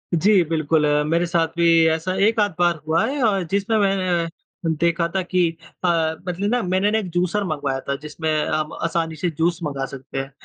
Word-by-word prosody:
जी, 190 +3 +4
बिल्कुल 155 -1 +1
अ, 150 0 +2
मेरे 170 +3 +1
साथ 165 -1 +1
भी 170 - +3 0.3
ऐसा 165 +3 -3
1 225 0 +1
आध 205 -2 +2
बार 175 -2 +2
हुआ 160 +1 +2
है 285 +2 -3
अ, 200 -4 +2
जिसमें 200 +3 +1
मैं 185 -4 +1
अ, - - -6 0.5
देखा 170 0 +2
था 190 - +2
कि 180 -2 +1 0.3
अ, 180 - +2 0.4
मतलब 185 +4 -1
ना 245 -1 +2
मैंने 185 +3 +1
ना 220 - +2
एक 190 - -5
जूसर 180 +3 0
मँगवाया 145 -6 -2
था 140 - +1
जिसमें 155 +2 -4 0.2
हम 155 0 -1
आसानी 165 -1 -1
से 175 +3 -1
जूस 170 +1 +1
मँगा 140 -3 -2
सकते 135 0 -9
हैं 135 0 -3
170 Hz, 205 wpm, -22 LUFS, 155-190 Hz, 0.5 s, जी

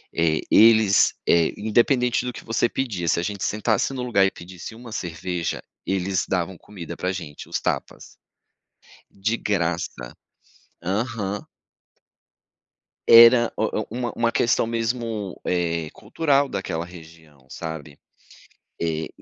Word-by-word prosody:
eh, 80 -2 +2
eles, 110 -2 +6
eh, 85 -1 +4
independente 120 +3 +2
do 125 - -2
que - - -10
você 115 +1 +1
pedia, 105 -11 -3
se - - +2
a - - -2
gente 100 +1 -4
sentasse 110 +4 0
no 130 -2 -4
lugar 110 -6 +3
e 95 - +1
pedisse 90 +4 -10
uma 120 0 -11
cerveja, 85 -2 -3 0.3
eles 95 -1 0
davam 95 0 -1
comida 85 -3 -9
pra 90 - -2
gente, 85 -6 -8
os - - -1
tapas. - - -4 0.9
De 110 +4 -1
graça. 85 - -2 0.7
Aham. 105 +1 -2 1.7
Era 115 +1 +8
o - - -1 0.2
o - - -15
uma 120 +1 -3
uma 115 0 +2
questão 115 -1 +2
mesmo, 115 -3 -3
eh, 85 -3 -1
cultural 140 +4 +1
daquela 85 -3 -3
região, 80 -5 -15
sabe. 80 -2 -7 0.8
Eh, 80 -1 -2
100 Hz, 130 wpm, -23 LUFS, 85-115 Hz, 1.7 s, Era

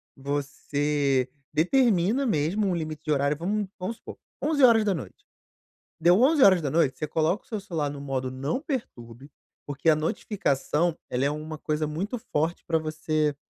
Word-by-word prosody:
Você 140 -1 -1 0.2
determina 215 - +2
mesmo 190 - +1
um 185 - 0
limite 155 -2 -5
de 155 - -1
horário, 140 0 +2
vamo 200 +4 -1
vamos 190 +5 -4
supor: - - -10 0.2
23h. 225 - +2 0.8
Deu 175 +4 +5
23h, 180 - +4
você 155 - -2
coloca 160 +5 0
o - - -29
seu 220 - -3
celular 165 -7 -2
no 145 - -7
modo 135 -2 -3
"não 135 - -2
perturbe", 140 - -6 0.4
porque 145 +2 -3
a 160 - +7
notificação 160 -1 -1
ela 125 +2 -1
é 140 - +2
uma 155 +1 -5
coisa 155 0 -1
muito 190 +11 -3
forte 160 -4 -2
pra 165 -1 +2
você 155 -1 -1
155 Hz, 145 wpm, -26 LUFS, 145-195 Hz, 0.8 s, a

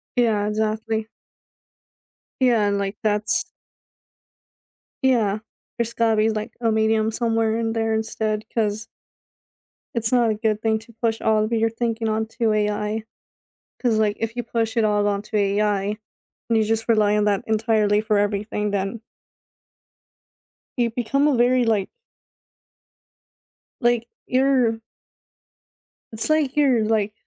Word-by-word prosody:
Yeah, 220 -4 +2
exactly. 220 +1 -1 1.3
Yeah, 235 -5 +3
and 200 0 +1
like 200 +1 -3
that's 215 - +1 1.6
Yeah, 220 -6 +2 0.4
there's 230 -1 -2
gotta 230 -1 +2
be 215 +1 +3
like 220 +1 -4
a 230 -1 +2
medium 220 0 +2
somewhere 225 -1 0
in 225 -1 -1
there 225 -1 0
instead 220 -1 -2
'cause 215 0 -1 1.1
it's 230 -1 -1
not 240 -3 +3
a - - +2
good 215 0 -1
thing 220 -1 +1
to 225 +1 -17
push 225 -1 0
all 215 -1 +2
of 215 - -3
your 225 0 +2
thinking 230 0 -2
onto 220 +1 0
AI 210 +1 -1 0.8
'cause 230 -4 +1
like 210 -1 +1
if 225 0 -3
you 245 - -3
push 225 0 -2
it 230 - +3
all 205 -1 +2
onto 205 +1 -2
AI 205 0 +1 0.5
and 230 - +2
you 220 - +3
just 225 +1 -1
rely 210 -2 +3
on 210 - +2
that 200 -2 +1
entirely 215 -1 +2
for 215 -1 +1
everything 205 0 -1
then 200 +2 -2 1.8
you 240 -1 +2
become 245 +5 0
a 290 - +3
very 245 0 +3
like 215 -4 +1 1.9
like, 240 -1 +1 0.2
you're 255 -4 +2 1.3
It's 220 +6 -2
like 300 -3 +1
you're 260 -6 +4
like 215 -1 0
220 Hz, 135 wpm, -22 LUFS, 210-230 Hz, 1.9 s, you're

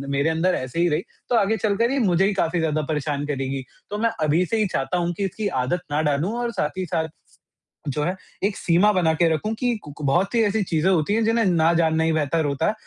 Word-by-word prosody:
मेरे 140 +3 +2
अंदर 165 +3 +1
ऐसे 130 +5 -4
ही 175 - +4
रही 155 +2 0 0.3
तो 245 - +2
आगे 220 0 +2
चलकर 220 +4 +1
ये 275 - +1
मुझे 190 -4 +3
ही 200 - +1
काफ़ी 175 -2 0
ज़्यादा 155 -1 0
परेशान 145 -1 -2
करेगी। 135 -2 -3 0.3
तो 205 - -3
मैं 230 +2 +2 0.2
अभी 160 +5 +2
से 225 - -1
ही 215 -2 +2
चाहता 135 +7 -1
हूँ 175 0 -1
कि 200 - -1
इसकी 205 +2 -3 0.2
आदत 175 +7 -1
ना 150 +1 +1
डालूँ 150 +7 0
और 240 -1 -1
साथ 150 -5 -2
ही 185 - -2
साथ, 160 -1 -1 0.8
जो 150 +2 -1
है 180 +3 -1 0.3
एक 200 0 0
सीमा 180 +5 +3
बना 175 -4 +2
के 170 +1 +3
रखूँ 215 +8 -2
कि 245 -2 0
कू 145 - -9
कू 150 - -7
बहुत 175 +8 +2
सी 230 -2 +3
ऐसी 210 0 +1
चीज़ें 170 +1 +1
होती 180 +3 +2
हैं 225 0 +2
जिन्हें 230 +1 +2
ना 170 -3 +3
जानना 160 -1 +2
ही 160 - +2
बेहतर 155 +1 0
होता 145 +2 0
है। - - +2
170 Hz, 250 wpm, -23 LUFS, 155-205 Hz, 0.8 s, ही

